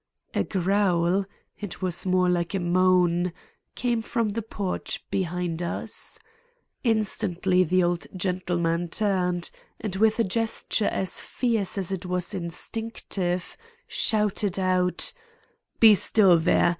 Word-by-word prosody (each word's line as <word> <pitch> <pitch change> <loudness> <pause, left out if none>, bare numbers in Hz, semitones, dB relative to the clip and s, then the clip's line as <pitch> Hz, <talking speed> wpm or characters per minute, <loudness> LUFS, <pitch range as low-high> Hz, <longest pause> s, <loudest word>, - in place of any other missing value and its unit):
A - - +1
growl—it 190 0 -1
was 180 0 0
more 185 0 +3
like 175 +1 0
a - - +1
moan—came 180 +6 0
from 230 -1 -1
the 220 +3 -2
porch 200 -3 -4
behind 180 -2 -2
us. 170 - -4 0.7
Instantly 195 -5 +2
the 185 +2 +2
old 175 0 0
gentleman 175 -2 0
turned 180 -3 0 0.3
and 205 -4 -4
with 220 +1 +3
a 230 - +3
gesture 220 +1 0
as 190 - -1
fierce 225 -6 -1
as 195 -2 0
it 185 -1 -4
was 180 +1 -2
instinctive, 185 0 -4 0.3
shouted 210 -3 0
out: 185 -1 +1 0.7
"Be 220 -2 +9
still 195 -3 +5
there! 170 +1 +3
185 Hz, 115 wpm, -26 LUFS, 175-205 Hz, 0.7 s, Be